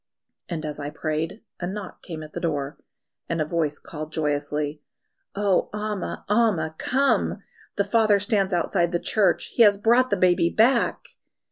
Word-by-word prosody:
And 160 -3 -3
as 150 -1 -5
I 145 0 -4
prayed, 155 +7 -3 0.2
a 175 - -3
knock 200 +2 -7
came 160 -3 -7
at 155 - -12
the - - -4
door, 145 -3 -3 0.5
and 165 - -1
a 155 - +1
voice 155 -2 -1
called 155 -1 -8
joyously, 150 -1 -2 0.5
"Oh, 200 -2 +1
Amma! 210 -2 -4
Amma! 205 -8 +2
Come! 275 +2 +1 0.3
The 200 - +2
father 215 -1 +3
stands 205 -2 +1
outside 175 0 +1
the 175 - +1
church; 210 +1 +1
he - - +2
has 205 -3 +7
brought 240 +5 +3
the 205 - +1
baby 180 -2 +3
back!" 230 +8 +2
175 Hz, 160 wpm, -24 LUFS, 155-210 Hz, 0.5 s, has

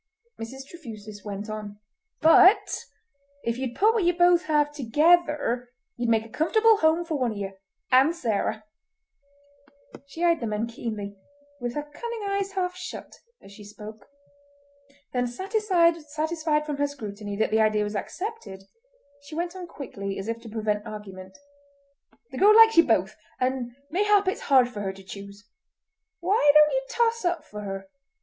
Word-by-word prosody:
Mrs. 265 +4 -7
Trefusis 215 - -10
went 205 0 -6
on: 210 -1 -7 0.4
"But 370 +5 +6 0.7
if 235 +1 -2
ye'd 260 -2 -4
put 435 +3 +4
what 445 -4 +1
ye 350 - +4
both 350 -1 +4
have 295 -1 +1
together 295 -2 +2 0.3
ye'd 240 -1 -2
make 225 -1 +2
a - - -13
comfortable 440 - +3
home 320 0 +2
for 315 -4 -2
one 245 -3 0
of - - -9
ye—and 200 - 0
Sarah!" 220 -6 -2 1.4
She 325 +5 -6
eyed 335 -1 +3
the 235 - -3
men 210 +1 -1
keenly, 215 -4 -6 0.4
with 245 -1 -4
her 295 - -2
cunning 450 +10 -7
eyes 395 0 -2
half 360 -2 -2
shut, 370 - -8 0.3
as 195 - -14
she 205 +1 -13
spoke; 210 0 -11 1.1
then 245 -1 0
satisfied 330 - 0
from 295 -2 -4
her 285 0 +1
scrutiny 210 -7 -7
that 220 - 0
the 220 0 +3
idea 215 -1 +2
was 210 +1 -4
accepted 360 - -6 0.6
she 285 +2 -11
went 345 +2 -3
on 365 -2 -7
quickly, 200 -11 -6
as 195 - -5
if 230 0 -3
to 230 - -10
prevent 210 -1 -2
argument: 190 -3 -9 0.9
"The - - -6
girl 420 +2 +7
likes 450 0 +8
ye 335 - +9
both, 215 - +1 0.2
and 255 -2 -2 0.2
mayhap 405 +2 +3
it's 375 - -1
hard 260 -3 +4
for 215 -4 -7
her 190 -1 -3
to 195 0 -14
choose. 200 +1 -11 0.7
Why 360 -4 +4
don't 300 0 +7
ye - - +1
toss 465 -1 +1
up 350 -1 -1
for 210 0 -8
her? 195 -1 -6
260 Hz, 160 wpm, -26 LUFS, 215-345 Hz, 1.4 s, ye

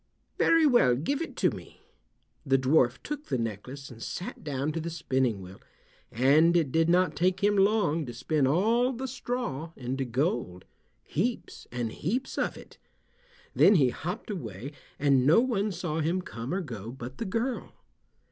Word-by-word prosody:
"Very 330 -1 +5
well, 240 - +5
give 270 - -1
it 330 - -5
to - - +2
me." - - -11 0.6
The 135 -2 +3
dwarf 130 -1 +3
took 295 0 -5
the 130 - 0
necklace 120 +5 -5
and 115 -1 -12
sat 180 - -6
down 145 0 -2
to 165 - -3
the 165 +1 -4
spinning 130 - -1
wheel, 95 +2 -12 0.5
and 150 +8 +4
it 155 -6 +1
did 165 +2 +2
not 175 -3 +3
take 185 +4 +1
him 205 0 +4
long 195 -7 +2
to 120 - -6
spin 135 +3 +1
all 225 - +2
the 260 +2 -4
straw 245 - -4
into 130 +1 -3
gold—heaps 130 - -3
and 120 -2 -3
heaps 240 - -3
of - - -1
it. - - -14 0.7
Then 205 - +6
he 135 -7 +4
hopped 180 - -5
away, 120 - -6 0.3
and 140 -3 +3
no 160 +8 +7
one 215 -4 0
saw 170 -3 -3
him 170 +4 0
come 115 0 -6
or 190 +2 0
go 115 - -7
but 130 0 -9
the - - -2
girl. 230 +6 -2
155 Hz, 165 wpm, -28 LUFS, 130-195 Hz, 0.7 s, no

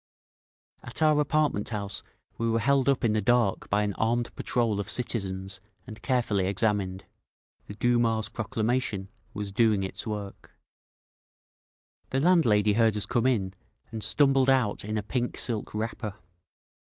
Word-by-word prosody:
At 120 +6 -4
our 155 -1 +4
apartment 150 -7 +1
house 100 -3 -4 0.4
we 115 0 0
were 115 - +2
held 135 +4 +2
up 135 -2 +1
in 110 -2 +2
the 110 - +1
dark 120 -2 +1
by 105 +1 +2
an 100 -1 -1
armed 120 +2 0
patrol 115 -4 0
of 100 - -4
citizens 95 -5 -2 0.2
and 110 -3 -10
carefully 115 -8 0
examined. 100 -2 -1 0.6
The 105 - -8
Duma's 115 -2 +1
proclamation 110 -1 -2 0.3
was 105 -1 -4
doing 105 -1 +2
its 95 - -6
work…. 105 -2 -7 1.5
The 135 - 0
landlady 120 - +4
heard 110 -1 +3
us 100 - -1
come 120 +2 +1
in, 100 -7 0 0.4
and 110 -1 -5
stumbled 135 +3 +3
out 125 -6 +2
in 110 +1 -3
a 105 - -2
pink 120 +4 -2
silk 110 -3 -2
wrapper. 110 -1 -4
110 Hz, 145 wpm, -27 LUFS, 100-120 Hz, 1.5 s, our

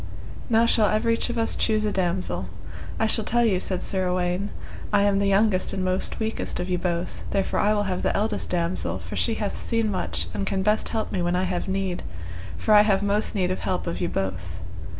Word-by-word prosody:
Now 230 0 +4
shall 220 -2 +4
everych 230 +2 +1
of 240 - -3
us 225 0 +3
choose 215 -1 +1
a 210 - +1
damosel. 185 -1 -1 0.5
I - - +3
shall 220 0 +3
tell 240 +2 +2
you, 195 -5 +2
said 185 -1 -1
Sir 190 -2 0
Uwaine, 180 +2 0 0.4
I 205 -1 +4
am 200 -1 +3
the 200 - +2
youngest 195 -1 +3
and 190 -1 -1
most 185 +1 -1
weakest 220 -4 -2
of 180 - -2
you 180 - +1
both, 175 -1 -2
therefore 195 -1 0
I 205 - +3
will 205 - +1
have 185 -2 -2
the - - +1
eldest 215 +2 -1
damosel, 175 0 -1
for - - -8
she - - +1
hath - - -3
seen 230 -2 0
much, 85 - -2
and 100 -1 -3
can 190 -1 0
best 210 +2 +2
help 220 -1 -2
me 185 - -1
when 175 +1 +1
I 180 - +1
have 180 0 -2
need, 190 -2 -1 0.6
for 215 - +2
I 210 - +9
have 200 -2 +2
most 205 +2 +1
need 185 -2 +1
of 185 - -2
help 185 - -2
of 170 - -3
you 175 - 0
both. 90 -3 -3
195 Hz, 225 wpm, -25 LUFS, 180-215 Hz, 0.6 s, I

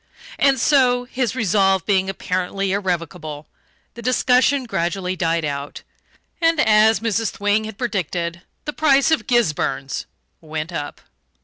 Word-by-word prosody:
And 275 -2 +3
so 250 -2 +3
his 250 -2 -2
resolve 195 -5 +2
being 190 -2 +1
apparently 185 +1 -2
irrevocable 170 -6 -3 0.5
the 235 - -10
discussion 255 +2 +2
gradually 185 -3 -2
died 165 -2 0
out, 140 -1 -5 0.6
and, 330 -1 +3
as 220 -3 +4
Mrs. 225 -1 0
Thwing 205 +2 0
had 215 -2 -8
predicted, 175 - -3 0.2
the 295 - -3
price 280 -1 +3
of 320 - +1
"Gisburns" 150 - 0 0.4
went 155 +1 -5
up. 145 -3 -5
200 Hz, 125 wpm, -21 LUFS, 170-245 Hz, 0.6 s, as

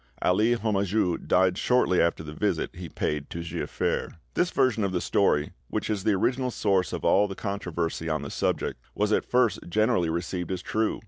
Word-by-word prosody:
Ali 110 +6 +3
Homajou 100 -5 0
died 90 0 +3
shortly 125 -8 +3
after 85 -1 +1
the 75 -1 -8
visit - - -1
he 85 -1 -7
paid 75 -1 -2
to 85 - -5
Giafer." 85 0 -2 0.2
This 175 - +2
version 130 -5 +2
of 100 - 0
the 90 - +1
story, 75 -6 +2 0.2
which - - -2
is 100 -3 -2
the 110 -1 +3
original 130 +6 +1
source 95 -7 +1
of - - -4
all 105 +1 +4
the 95 - -6
controversy 85 -5 -3
on 75 -2 -1
the 70 - -6
subject, - - -1 0.2
was 105 +1 +1
at - - +1
first 125 -5 +3
generally 90 -4 +2
received 85 +2 -3
as 90 -1 -3
true. 110 0 0
95 Hz, 190 wpm, -27 LUFS, 85-110 Hz, 0.2 s, all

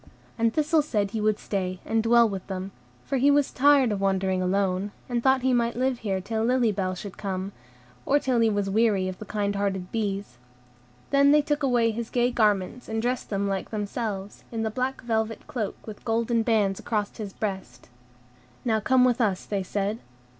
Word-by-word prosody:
And 230 -1 +2
Thistle 310 +3 +2
said 210 -9 -1
he 220 - -2
would 215 0 +2
stay 185 -3 -3
and 225 0 +1
dwell 235 +1 +5
with 195 -3 -6
them; 190 0 -5 0.3
for 275 - -1
he 275 +3 +4
was 285 -1 +3
tired 275 -3 +4
of 200 -1 -2
wandering 190 -1 +1
alone, 190 +1 0 0.2
and 240 -1 -1
thought 265 0 +3
he 260 0 +3
might 235 -1 +1
live 255 0 0
here 195 -4 -1
till 220 +3 -2
Lily 245 -1 +3
Bell 185 -2 -2
should 195 +1 -8
come, 190 -1 -3 0.5
or 285 - +3
till 260 -4 +1
he 225 -1 +4
was 205 -2 0
weary 200 -2 +2
of 185 -1 -6
the 215 - -7
kind 205 -1 -1
hearted 190 -2 -2
bees. 200 - -3 0.7
Then 280 0 +5
they 295 0 +5
took 295 0 -1
away 240 -4 +2
his 230 +1 -5
gay 245 0 +1
garments, 215 0 0
and 225 0 -1
dressed 245 +1 -2
him 200 0 0
like 195 -1 -2
themselves, 205 -2 -4
in 225 -1 -2
the 220 - -1
black 255 +3 -2
velvet 225 -2 -2
cloak 220 -6 -3
with 215 -2 -9
golden 230 0 +1
bands 215 -4 +1
across 210 -3 -2
his 210 -3 -5
breast. 195 -2 -5 0.8
"Now 220 -2 +2
come 255 +3 +4
with 250 0 +2
us," 200 -5 0
they 200 -2 -2
said. 200 +3 -2
220 Hz, 195 wpm, -26 LUFS, 195-245 Hz, 0.8 s, dwell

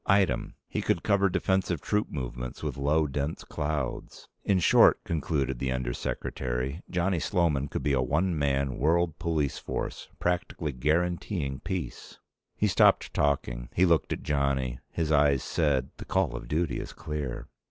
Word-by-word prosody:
Item. 95 -1 +2
He - - -2
could 85 - 0
cover 100 -2 +3
defensive 95 -2 +1
troop 105 +6 0
movements 60 -3 -5
with - - -2
low, 75 +3 +2
dense 70 +2 -3
clouds. 75 -3 -4 0.2
In 100 - +3
short, 90 - +5
concluded 70 -5 -1
the 65 -1 -1
Under 65 -1 -1
Secretary, 65 +7 -3
Johnny 90 0 +1
Sloman 75 -5 +1
could - - -4
be 70 - +2
a 65 - +3
one 80 +8 +1
man 70 -3 0
world 80 +3 +2
police 80 -4 0
force - - -4
practically 85 -3 -1
guaranteeing 75 +1 0
peace. 95 -2 -5 0.4
He - - +1
stopped - - +4
talking. - - 0
He 90 - +5
looked 85 -6 +2
at - - -3
Johnny. 70 -4 0
His 80 -2 -1
eyes 70 -3 +4
said, 70 -5 +1
the - - -8
call 95 -10 +1
of - - -6
duty 80 +2 0
is - - -7
clear. 65 -5 -5
75 Hz, 155 wpm, -28 LUFS, 65-85 Hz, 0.4 s, short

